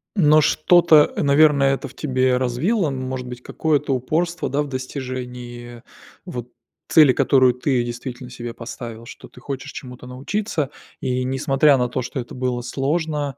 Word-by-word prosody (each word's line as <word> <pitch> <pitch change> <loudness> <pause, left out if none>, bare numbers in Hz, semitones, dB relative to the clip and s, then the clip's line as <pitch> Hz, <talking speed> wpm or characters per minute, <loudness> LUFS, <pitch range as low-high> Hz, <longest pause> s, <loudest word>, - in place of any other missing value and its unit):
Но 155 -5 +5
что-то, 160 0 +5
э, - - -1
наверное, 140 -1 +4
это 135 - -4
в 130 - -14
тебе 130 -3 +1
развило? 150 - 0
Ну, 135 -2 -4
может 130 -1 -5
быть 125 0 -8
какое-то 145 0 0
упорство, 170 +7 -1
да, 140 +2 0
в 145 - -3
достижении, 125 -3 -7 0.4
вот 125 -1 -6 0.4
цели, 150 -5 +6
которую 130 -2 +4
ты 125 -1 0
действительно 125 +1 -7
себе 120 -1 -7
поставил, 115 -1 -8
что - - -12
ты - - -16
хочешь 135 +1 -6
чему-то 125 -1 -10
научиться, 150 - -3 0.3
и 125 0 -1
несмотря 135 +2 +3
на 125 -1 +1
то, 125 +1 -3
что 125 +2 -5
это 120 - -7
было 125 -1 -2
сложно, 145 +2 -2
130 Hz, 160 wpm, -21 LUFS, 125-150 Hz, 0.4 s, цели